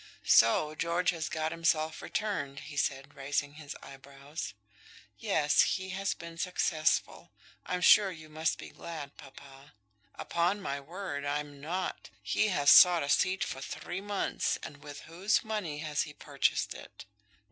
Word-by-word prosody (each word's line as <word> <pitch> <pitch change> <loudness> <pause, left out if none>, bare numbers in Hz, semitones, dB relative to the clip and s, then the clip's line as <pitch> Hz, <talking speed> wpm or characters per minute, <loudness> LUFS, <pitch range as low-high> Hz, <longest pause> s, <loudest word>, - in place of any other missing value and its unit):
"So 150 +7 +5
George 170 +3 +1
has 165 -2 -4
got 155 0 -2
himself 160 -1 0
returned," 145 -11 -3
he 150 - -10
said, 140 0 -1
raising 145 +1 -2
his 150 -1 -9
eyebrows. 140 +3 -8 0.6
"Yes, 155 -9 +3 0.2
he 190 0 -7
has 195 +1 -2
been 170 0 -10
successful. 165 -3 0 0.3
I'm 180 0 -2
sure 200 +2 +7
you 160 -4 -10
must 155 +1 -1
be - - -9
glad, 155 -4 -8
papa." 140 +1 -14 0.4
"Upon 175 +4 0
my 140 -8 -3
word, 145 -1 -6
I'm 145 0 -3
not. 180 +5 -4
He 215 - +1
has 145 -8 +8
bought 175 -3 0
a 140 - -4
seat 185 +6 +2
for 135 - -5
three 175 +6 -5
months; 205 0 -1
and 145 - -8
with 145 0 -10
whose 190 +6 0
money 210 -9 -3
has 150 -1 0
he 150 - -5
purchased 140 -2 0
it?" - - -12
155 Hz, 150 wpm, -31 LUFS, 145-180 Hz, 0.6 s, has